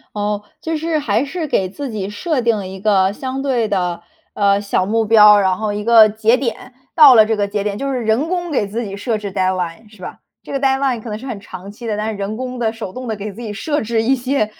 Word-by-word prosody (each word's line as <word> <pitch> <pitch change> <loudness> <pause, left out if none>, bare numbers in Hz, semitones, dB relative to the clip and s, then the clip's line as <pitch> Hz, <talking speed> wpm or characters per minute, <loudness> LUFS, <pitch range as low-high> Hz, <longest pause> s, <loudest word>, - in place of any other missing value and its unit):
哦， 210 0 -2 0.2
就 325 0 -2
是 315 0 -1
还 235 -1 0
是 315 +2 -4
给 190 -8 0
自 275 +9 -6
己 205 -4 -4
设 285 - -2
定 235 -2 +2
了 195 -3 -5
一 190 0 -8
个 195 -2 +2
相 260 +4 -5
对 250 -5 0
的， 180 -4 -2 0.3
呃， 200 0 +2
小 200 -2 0
目 225 +2 +1
标， 210 -1 +7
然 190 -2 +1
后 215 -1 -2
一 210 0 -4
个 225 -1 +7
节 220 +3 +2
点， 250 0 -4 0.2
到 295 -6 +8
了 220 -2 +7
这 220 0 0
个 205 -1 -1
节 200 0 -2
点 205 -1 -2
就 275 +5 -3
是 255 - -1
人 225 +9 +1
工 350 -2 -2
给 210 -8 0
自 230 +4 -4
己 195 -2 -6
设 220 +2 -2
置 200 -2 -6
deadline 185 +1 -2
是 185 - -14
吧？ - - -8 0.2
这 - - -10
个 275 - -1
deadline 265 -3 +1
可 225 - -8
能 210 - -4
是 255 - -10
很 240 -6 -5
长 195 0 -10
期 235 +2 -9
的， 210 -1 -2
但 215 +1 -2
是 205 - -7
人 205 +2 -4
工 255 -1 -5
地、 225 -2 0
手 225 -5 -7
动 255 -1 -7
地 220 - -2
给 205 0 -6
自 235 - -10
己 220 - -5
设 295 +8 -2
置 225 0 -1
一 255 +4 +2
些， 255 -2 0
220 Hz, 340 characters per minute, -18 LUFS, 205-255 Hz, 0.3 s, 到